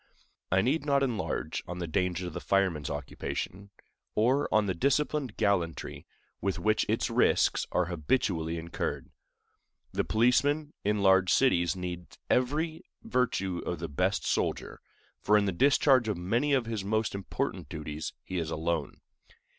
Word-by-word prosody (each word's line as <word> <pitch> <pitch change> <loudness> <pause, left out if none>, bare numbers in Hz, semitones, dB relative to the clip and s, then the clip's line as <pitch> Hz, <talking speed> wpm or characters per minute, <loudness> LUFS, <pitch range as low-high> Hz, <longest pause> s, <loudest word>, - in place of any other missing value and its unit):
I 95 +1 +4
need 140 +6 +1
not 140 -1 +2
enlarge 120 -7 -2
on 90 - -5
the 90 - -3
dangers 90 +2 -1
of 90 - -6
the - - -4
fireman's 95 -8 +1
occupation, 100 +3 -5 0.5
or 130 +7 +2
on 110 -1 +3
the 95 - 0
disciplined 140 - 0
gallantry 85 -6 -1 0.3
with 100 -1 -1
which 110 0 +1
its - - 0
risks - - +3
are 90 - +2
habitually 85 - -1
incurred. 85 +1 -4 0.8
The - - 0
policeman 145 +7 +2
in 105 0 +1
large 95 -1 +5
cities 90 -10 +3
needs 90 -1 -6
every 155 +6 +1 0.2
virtue 95 -8 0
of 90 - -3
the 85 0 -5
best 90 +7 0
soldier, - - -1 0.4
for 105 +1 +4
in 105 - +2
the 100 - +1
discharge 130 - +4
of 105 -4 -1
many 115 +11 +1
of 130 -3 +2
his 110 -3 -3
most 110 +2 0
important 100 -1 -3
duties 75 0 -5
he 95 -1 -3
is 80 -2 -3
alone. 80 -1 -2
100 Hz, 150 wpm, -29 LUFS, 85-125 Hz, 0.8 s, large